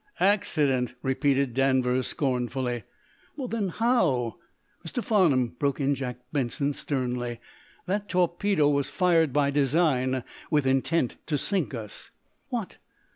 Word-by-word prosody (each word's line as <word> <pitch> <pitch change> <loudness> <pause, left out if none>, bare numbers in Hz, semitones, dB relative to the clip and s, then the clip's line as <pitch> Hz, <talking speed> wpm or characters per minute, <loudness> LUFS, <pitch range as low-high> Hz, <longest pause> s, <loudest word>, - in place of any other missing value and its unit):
"Accident!" 145 - +2
repeated 135 -1 +1
Danvers, 130 -1 +2
scornfully. 125 -3 -1 0.5
"Well, 270 -4 -4
then, 220 -5 -1
how 175 - +1 0.2
" - - -40
"Mr. 200 +8 -4
Farnum," 155 - +3
broke 140 -1 0
in 140 0 +2
Jack 125 -2 -4 0.2
Benson, 140 +1 0
sternly, 125 -4 -3 0.5
"that 200 +3 -2
torpedo 180 -2 +2
was 140 -2 +1
fired 165 -5 +3
by 140 +1 +2
design, 135 -3 +2 0.3
with 150 -3 +2
intent 135 +1 +1
to 150 - 0
sink 180 -3 -1
us!" 110 -3 -8 0.4
"What? - - -4
140 Hz, 125 wpm, -27 LUFS, 130-170 Hz, 0.5 s, Farnum